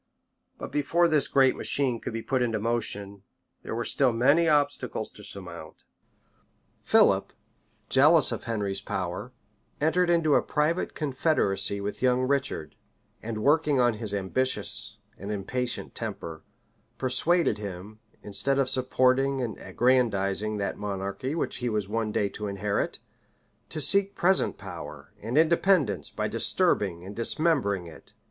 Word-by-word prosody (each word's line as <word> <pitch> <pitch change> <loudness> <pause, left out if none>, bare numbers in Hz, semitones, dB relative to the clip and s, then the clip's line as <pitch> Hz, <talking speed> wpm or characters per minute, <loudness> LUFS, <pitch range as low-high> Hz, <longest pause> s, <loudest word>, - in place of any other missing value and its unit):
But - - -7
before 165 +4 +2
this 155 -4 +3
great 135 -2 +3
machine 130 -5 +1
could - - -5
be 115 0 -5
put 130 -2 0
in 115 -3 0
motion, 105 -3 -3 0.4
there - - -5
were 120 0 -2
still 135 -3 +2
many 140 +8 +3
obstacles 145 -1 0
to - - -14
surmount. - - -9 1.0
Philip, - - +3 0.6
jealous 150 +3 +5
of - - -5
Henry's 105 -4 -2
power, 95 +6 -4 0.5
entered 175 +4 +2
into 165 -3 +3
a - - +5
private 155 +4 -1
confederacy 130 -9 +1
with 100 +1 -5
young 125 0 +2
Richard; 130 - -2 0.5
and 110 -1 -5
working 150 -1 +3
on 120 -1 +3
his 110 -1 -2
ambitious 105 +7 -1 0.2
and 100 +2 -5
impatient 120 +5 -3
temper, 80 -2 -5 0.6
persuaded 160 -1 +1
him, 100 +1 -8 0.2
instead 105 +7 -1
of 135 -1 +2
supporting 130 +1 +2
and 120 -3 -3
aggrandizing 110 -4 +1
that 100 -1 -3
monarchy 100 +7 -4
which 165 - -2
he 125 -1 -2
was 105 -3 -2
one 110 +1 -2
day 105 - 0
to 105 +1 -6
inherit, 100 +1 -2 0.7
to 155 - -3
seek 200 +6 +5
present 185 +2 +2
power - - -9
and 115 +6 -3
independence 160 - +2
by - - -3
disturbing 90 -4 +1
and 100 +2 -8
dismembering 115 - +1
it. 85 - -14
125 Hz, 140 wpm, -27 LUFS, 105-145 Hz, 1.0 s, jealous